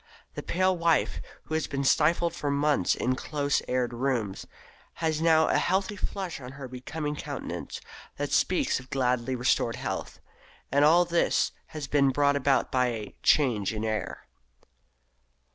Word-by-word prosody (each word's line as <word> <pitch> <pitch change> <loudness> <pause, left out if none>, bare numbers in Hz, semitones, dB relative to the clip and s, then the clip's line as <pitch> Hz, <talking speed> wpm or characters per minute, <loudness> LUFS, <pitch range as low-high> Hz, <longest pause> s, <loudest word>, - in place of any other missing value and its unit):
The - - -5
pale 185 +1 +1
wife, 170 -2 +1 0.2
who - - -8
has 160 0 0
been 140 -1 -2
stifled 165 +5 +3
for 145 - -3
months 140 -8 +2
in 125 - 0
close 145 0 -1
aired 125 -1 0
rooms, 120 -6 -2 0.5
has 160 -1 -1
now 160 -1 +4
a - - +2
healthy 190 +3 0
flush 190 -6 -4
on 125 +1 -9
her 135 -1 -8
becoming 150 +4 -5
countenance - - -6 0.4
that - - -3
speaks - - +2
of 130 0 -14
gladly 125 -1 0
restored 120 -1 +1
health. 115 -7 -5 0.5
And 140 +2 +4
all 170 +4 +6
this 170 0 +1 0.2
has 155 -2 -6
been 140 0 +3
brought 140 +1 +2
about 140 -1 +1
by 125 -1 +2
a 110 -4 -5
"change 115 -9 +3
of 110 0 -3
air"! 110 -1 -3
140 Hz, 155 wpm, -27 LUFS, 125-160 Hz, 0.5 s, all